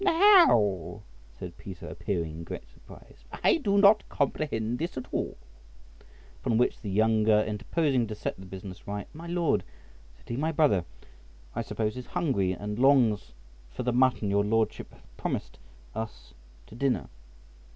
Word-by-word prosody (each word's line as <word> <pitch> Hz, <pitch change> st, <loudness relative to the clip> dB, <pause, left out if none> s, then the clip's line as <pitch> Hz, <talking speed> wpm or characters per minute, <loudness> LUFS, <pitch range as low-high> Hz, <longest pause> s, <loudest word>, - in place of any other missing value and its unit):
"How," 115 Hz, -, +5 dB, 0.3 s
said 85 Hz, +3 st, -8 dB
Peter, 95 Hz, -3 st, -9 dB
appearing 85 Hz, +1 st, -3 dB
in 80 Hz, +2 st, -8 dB
great 80 Hz, -, -7 dB
surprise, -, -, -17 dB, 0.2 s
"I -, -, +5 dB
do 205 Hz, -10 st, +1 dB
not 200 Hz, +1 st, +7 dB
comprehend 125 Hz, -5 st, -1 dB
this 165 Hz, -1 st, -3 dB
at 130 Hz, -, -4 dB
all;" -, -, -2 dB, 1.1 s
upon 110 Hz, -, +1 dB
which 125 Hz, -, +1 dB
the 105 Hz, -, -5 dB
younger, 110 Hz, +1 st, +3 dB
interposing 120 Hz, +4 st, 0 dB
to 110 Hz, -, -5 dB
set -, -, -3 dB
the 95 Hz, -, -10 dB
business 95 Hz, 0 st, -9 dB
right, 100 Hz, 0 st, -4 dB
"My 165 Hz, +3 st, -9 dB
Lord," 170 Hz, -3 st, +1 dB, 0.5 s
said -, -, -24 dB
he, 120 Hz, -, -3 dB
"my 155 Hz, +4 st, 0 dB
brother, 145 Hz, -, +3 dB, 0.7 s
I -, -, -1 dB
suppose, 110 Hz, 0 st, -2 dB
is 125 Hz, -, -7 dB
hungry, 100 Hz, -, 0 dB
and 105 Hz, +3 st, -4 dB
longs 125 Hz, -, +3 dB, 0.4 s
for -, -, -5 dB
the 125 Hz, 0 st, 0 dB
mutton 125 Hz, -5 st, +2 dB
your 100 Hz, 0 st, +3 dB
Lordship 110 Hz, +1 st, 0 dB
hath -, -, -20 dB
promised -, -, -4 dB, 0.3 s
us 105 Hz, -, -7 dB, 0.3 s
to -, -, -16 dB
dinner." 130 Hz, +2 st, 0 dB
110 Hz, 155 wpm, -28 LUFS, 100-140 Hz, 1.1 s, not